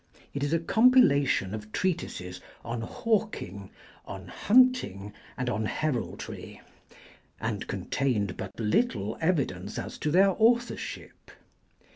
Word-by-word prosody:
It 140 - -3
is 145 - 0
a 165 - +4
compilation 165 - +4
of 105 0 -7
treatises 90 - -2 0.2
on 115 0 -3
hawking, 115 - -2 0.4
on - - -8
hunting, 215 - +3 0.2
and 130 - -2
on 110 -3 -1
heraldry, 150 -3 -4 0.8
and - - -3
contained 105 -9 -1
but 95 +2 -7
little 110 - +1
evidence 130 - -1
as - - -6
to 150 - -1
their 190 +5 +5
authorship. 240 +2 0
140 Hz, 110 wpm, -28 LUFS, -, 0.8 s, their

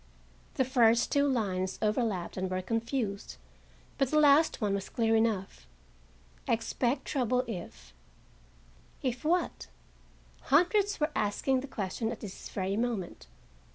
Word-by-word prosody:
The 260 - +2
first 235 -2 +3
two 285 0 +3
lines 190 -8 -1
overlapped 210 -4 -1
and 185 0 -2
were 185 0 -2
confused, 225 -1 -3 0.6
but 270 - +2
the 305 - +1
last 300 +1 +5
one 205 -3 0
was 195 -1 -3
clear 225 -1 +1
enough. 210 - -1 0.8
Expect 235 +3 0
trouble 250 -2 +1
if—If - - -9
what? 335 - 0 0.8
Hundreds 385 +8 +3
were 300 +1 +1
asking 255 +6 +1
the 270 - -6
question 210 -1 -3
and 230 - -1
at - - -10
this 200 -3 -8
very 190 0 -2
moment. 220 - -3
225 Hz, 125 wpm, -30 LUFS, 190-260 Hz, 0.8 s, last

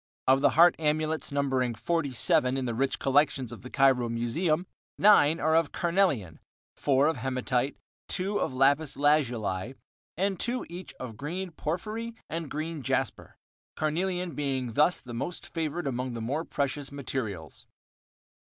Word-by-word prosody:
Of 135 +1 +5
the 145 - +5
heart 175 +1 +7
amulets, 155 0 0
numbering 135 -4 0
47 135 -2 +1
in 130 - -2
the 120 - -2
rich 135 +4 0
collections 135 -3 +2
of - - -9
the 125 - -9
Cairo 130 -3 +3
Museum, 155 +9 0 0.3
nine 170 -6 +6
are 160 +1 +2
of 165 -3 +2
carnelian, 170 - 0 0.4
four 135 0 +2
of 160 -2 +1
hematite, 130 +1 -1 0.3
two 200 +2 -1
of - - -1
lapis 140 +3 +2
lazuli, 125 -7 +1 0.4
and 195 0 0
two 245 +2 -2
each 180 +2 -8
of 115 -4 -8
green 175 +7 -4
porphyry 215 +9 -4 0.2
and 165 -2 -3
green 155 0 -4
jasper, 125 - -2 0.4
carnelian 175 +3 -1
being 130 -4 -2
thus 150 +8 +3
the 120 - -9
most 135 +9 -4
favored 165 0 -3
among 130 -1 -2
the 115 - -4
more 145 +9 -2
precious 140 0 -2
materials. 110 - -5
145 Hz, 145 wpm, -28 LUFS, 130-165 Hz, 0.4 s, heart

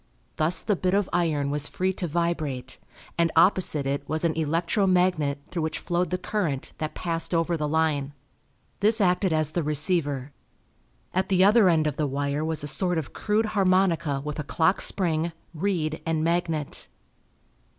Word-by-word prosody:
Thus 160 +3 +2
the 210 - +1
bit 185 +1 0
of 200 -1 +1
iron 150 -5 0
was 145 0 +2
free 185 +1 -1
to 180 - -3
vibrate, 150 -6 -2 0.4
and 165 -1 +3
opposite 165 -4 +3
it 140 +1 -3
was 155 +2 -1
an 165 - +2
electro 165 +5 0
magnet 180 -6 +2
through 170 - -2
which 160 0 -2
flowed 175 0 -1
the 180 - -1
current 170 -11 -2
that 155 -1 -4
passed 165 0 -2
over 165 +1 +1
the 150 -2 -2
line. 150 -2 0 0.7
This 215 +2 +3
acted 185 -1 +2
as 155 -1 +1
the 170 - -1
receiver. 150 -3 0 0.8
At 185 +1 0
the 185 -1 +4
other 205 -1 +6
end 160 -2 +2
of 150 -2 -2
the 150 - 0
wire 140 +2 -2
was 160 -2 -2
a - - -3
sort 180 +3 +1
of 155 -4 -4
crude 215 +1 0
harmonica 185 -7 +2
with 150 0 -4
a - - -2
clock 180 +6 +1
spring, 170 -3 0 0.2
reed, 160 -3 -2
and 160 -1 -1
magnet. 165 -3 -2
165 Hz, 170 wpm, -25 LUFS, 150-180 Hz, 0.8 s, other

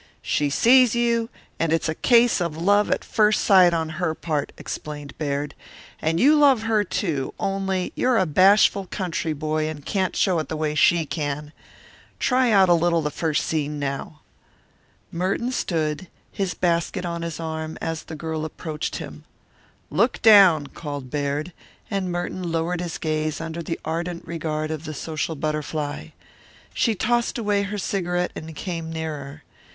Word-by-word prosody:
"She 145 -1 +1
sees 245 - +5
you, 235 -1 +1 0.3
and 165 -1 +1
it's 165 0 +1
a 160 - 0
case 235 +3 +4
of 170 -3 -2
love 205 +5 +3
at - - 0
first 215 0 +2
sight 185 -3 +6
on 165 -1 -1
her 160 -3 0
part," 155 -4 -2
explained 145 -1 -7
Baird. 145 -1 -2 0.5
"And 165 +1 0
you 290 +5 +6
love 275 -6 +5
her, 220 -2 +2
too, 160 -8 -2
only 195 -1 -1
you're 250 -2 +2
a 185 - +3
bashful 195 +3 +4
country 170 -4 -2
boy 155 +1 -1
and 145 -2 -8
can't 190 -2 -1
show 180 -4 +2
it 155 - -4
the 160 - -3
way 155 -1 -1
she 165 +2 +4
can. 150 -1 -4 0.6
Try 255 -1 +2
out 195 -3 +5
a 175 - +5
little 170 -2 +2
first 155 -1 -1
scene 150 -2 -2
now." 140 +2 -4 0.9
Merton 190 +8 -1
stood, 160 -6 -2 0.2
his 195 -3 -2
basket 170 +1 0
on 170 -1 -3
his 170 -1 -5
arm, 160 -1 -4
as 165 -1 -3
the 160 - -9
girl 160 0 -4
approached 155 0 -4
him. - - -8 0.7
"Look 220 - +2
down," 195 -9 +7
called 145 -4 -7
Baird, 145 +3 -2 0.4
and 190 -3 -1
Merton 175 0 -3
lowered 165 +2 -1
his 175 -2 -4
gaze 155 -1 -2
under 165 +1 -5
the 165 0 -4
ardent 170 +1 -3
regard 155 -2 -3
of 155 0 -5
the 155 -1 -5
social 160 +2 -3
butterfly. 150 0 -3 0.7
She 225 -3 +1
tossed 240 +4 0
away 205 -3 +1
her 200 +1 -3
cigarette 180 -2 -1
and 160 0 -8
came 165 -1 -5
nearer. 155 -2 -6
165 Hz, 160 wpm, -23 LUFS, 155-195 Hz, 0.9 s, down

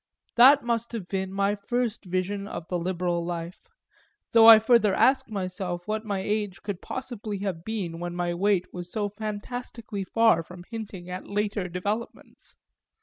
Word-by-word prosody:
That 270 +4 +8
must 235 0 -1
have 210 -6 -5
been 190 -1 -2
my 200 +1 +1
first 230 +1 -2
vision 185 +2 -2
of 175 -5 -7
the 180 - -1
liberal 175 -1 -1
life 170 0 -6 0.6
though 225 -1 +7
I 225 -1 +12
further 220 -2 +4
ask 265 -2 +3
myself 185 -3 -4
what 215 +1 -2
my 200 -2 -1
age 205 -2 -2
could 200 -3 -4
possibly 230 -5 -5
have 185 -5 -3
been 190 -6 -4
when 175 0 -4
my 175 -1 -1
weight 190 0 +2
was 180 0 -7
so 210 -2 -1
fantastically 215 0 -5
far 225 -2 +3
from 175 +2 -11
hinting 205 -6 -7
at 180 +1 -6
later 205 -2 -1
developments. 205 +6 -5
200 Hz, 160 wpm, -26 LUFS, 180-220 Hz, 0.6 s, I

